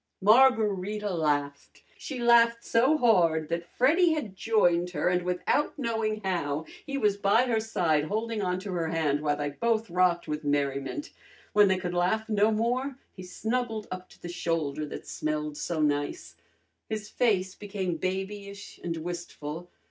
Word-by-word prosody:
Margarita 210 -3 +3
laughed. 145 -3 -2
She 275 - -7
laughed 235 -1 +4
so 260 +7 +3
hard 170 - +3
that 170 0 -3
Freddy 325 +7 +4
had 225 -11 -4
joined 180 -5 +2
her, 180 - -1
and 180 0 +1
without 180 +13 0
knowing 225 -4 -1
how, 160 -5 -1 0.2
he 275 -1 -2
was 210 -5 +2
by 200 +4 +3
her 235 -3 +1
side, 165 -9 +1
holding 220 +4 -2
on 180 -2 0
to 200 0 -6
her 170 -2 -1
hand 155 -3 0
while 145 -1 0
they 145 -1 -2
both 225 +4 -1
rocked 180 -1 +2
with 150 0 -3
merriment. 140 - -1 0.4
When 205 -1 +6
they 190 -1 +2
could 180 -1 -4
laugh 185 +5 +1
no 210 -1 +3
more 245 +5 0 0.2
he 185 - -10
snuggled 220 +4 -3
up 185 0 -6
to - - -19
the - - -8
shoulder 160 -4 -2
that - - -8
smelled 150 -1 -3
so 165 +1 -3
nice. 145 - -1 0.5
His 215 -1 -4
face 200 -6 +1
became 195 -5 -4
babyish 200 +2 -5
and 170 -1 -3
wistful. 170 -1 -6
190 Hz, 160 wpm, -28 LUFS, 165-225 Hz, 0.5 s, When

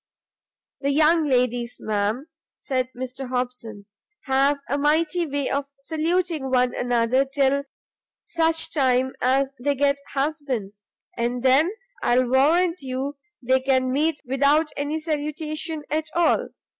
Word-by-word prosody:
"The 280 - -1
young 310 +2 +4
ladies, 245 -2 0
ma'am," 215 +5 -1 0.3
said 255 -2 -2
Mr 255 +1 -5
Hobson, 245 -5 -4 0.4
"have 275 +1 +2
a 280 - -1
mighty 320 +4 +1
way 285 -1 -2
of 280 0 -1
saluting 320 0 -1
one 250 -1 +2
another 245 +1 +2
till 275 0 +1 0.6
such 325 -1 +1
time 260 -2 +2
as 270 +2 +2
they 285 +3 0
get 280 0 +2
husbands: 270 -9 -3 0.3
and 240 +1 -2
then 270 +6 +5 0.3
I'll 250 +1 +3
warrant 330 +7 +3
you 270 +2 -4 0.3
they 260 +2 +3
can 260 -1 +1
meet 300 +3 +1
without 285 +4 +2
any 290 +2 -2
salutation 310 0 -3
at 310 +1 0
all. 345 -1 +2
275 Hz, 125 wpm, -24 LUFS, 255-305 Hz, 0.6 s, then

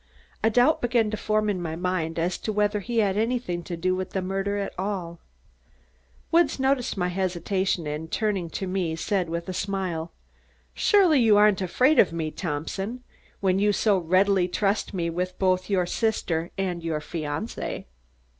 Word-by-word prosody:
A 220 - +5
doubt 245 +7 +3
began 235 -3 +2
to - - -1
form 215 0 0
in 195 -4 -1
my 160 -2 -3
mind 175 -2 -2
as 175 +2 -1
to 215 - -3
whether 210 0 +1
he 230 +4 -4
had 205 -3 +2
anything 225 -6 -1
to 175 - -5
do 185 +2 +1
with 185 0 -4
the 190 - 0
murder 195 +2 -1
at 200 - -3
all. 185 -4 -4 1.1
Woods 330 -5 +3
noticed 265 -4 +1
my 180 -1 0
hesitation 185 -1 -1
and 150 +2 -5
turning 200 -6 -1
to 190 - -4
me 185 -3 -1
said 180 +1 -1
with 170 +1 -4
a 185 - -3
smile: 180 -4 -3 0.6
"Surely 370 -9 +4
you 220 -4 +5
aren't 210 -2 +5
afraid 255 - +3
of 180 - +5
me, 160 -2 -3
Thompson, 195 +10 -4 0.4
when 190 -1 +2
you 205 +1 +3
so 205 -1 +2
readily 185 +2 +3
trust 200 +3 0
me 170 -3 -2
with 180 +2 -3
both 185 0 +1
your 185 -3 +2
sister 175 -5 -1
and 180 -3 -2
your 160 -2 -1
fiancée." 155 +6 -4
190 Hz, 175 wpm, -25 LUFS, 175-210 Hz, 1.1 s, A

